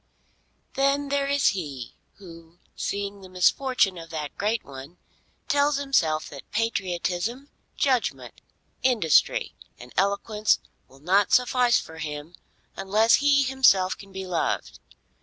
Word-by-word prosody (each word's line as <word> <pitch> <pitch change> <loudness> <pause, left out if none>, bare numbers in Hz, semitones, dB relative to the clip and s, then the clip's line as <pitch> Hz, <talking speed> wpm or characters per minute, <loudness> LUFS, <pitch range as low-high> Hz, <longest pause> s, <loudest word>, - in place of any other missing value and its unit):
Then 275 +1 +1
there 280 0 0
is 280 0 +3
he 140 - -6 0.2
who 170 -3 -14 0.2
seeing 200 0 -4
the 190 - -12
misfortune 190 +1 +2
of 165 0 -10
that 150 -3 -5
great 215 +2 -1
one, 140 +5 -11 0.5
tells 290 -1 +2
himself 170 - +1
that 140 -2 -12
patriotism, 215 +3 -2 0.3
judgment, 260 -4 -1 0.4
industry, 220 - +2 0.2
and 125 +1 -13
eloquence 205 +2 +1 0.3
will 135 - -19
not 190 +5 +2
suffice 250 -1 +3
for 160 0 -10
him 150 +1 -6 0.4
unless 215 +4 +3
he 285 -1 +3
himself 255 -9 +3
can 195 -1 -14
be 190 0 -6
loved. 175 -3 -2
200 Hz, 120 wpm, -25 LUFS, 165-255 Hz, 0.5 s, is